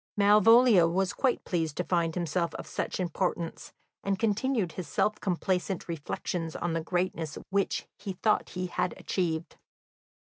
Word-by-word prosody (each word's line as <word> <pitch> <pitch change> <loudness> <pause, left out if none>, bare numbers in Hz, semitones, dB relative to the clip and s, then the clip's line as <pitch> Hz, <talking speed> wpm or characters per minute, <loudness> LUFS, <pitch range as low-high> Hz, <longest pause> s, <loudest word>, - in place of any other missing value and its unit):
Malvolio 210 -1 +6
was 185 +2 0
quite 260 -3 0
pleased 160 -4 -2
to 180 - 0
find 170 -2 0
himself 170 0 -1
of - - -6
such - - -3
importance, 175 -1 -2 0.3
and 195 -1 0
continued 220 -2 0
his 175 0 -6
self 210 +8 0
complacent 185 0 -1
reflections 165 +1 -4
on 175 -1 -2
the 165 - 0
greatness 170 -2 -2
which 200 0 0
he 200 -1 -4
thought 210 +4 +1
he 180 0 -3
had 180 0 -2
achieved. 165 -3 -2
180 Hz, 145 wpm, -29 LUFS, 165-200 Hz, 0.3 s, Malvolio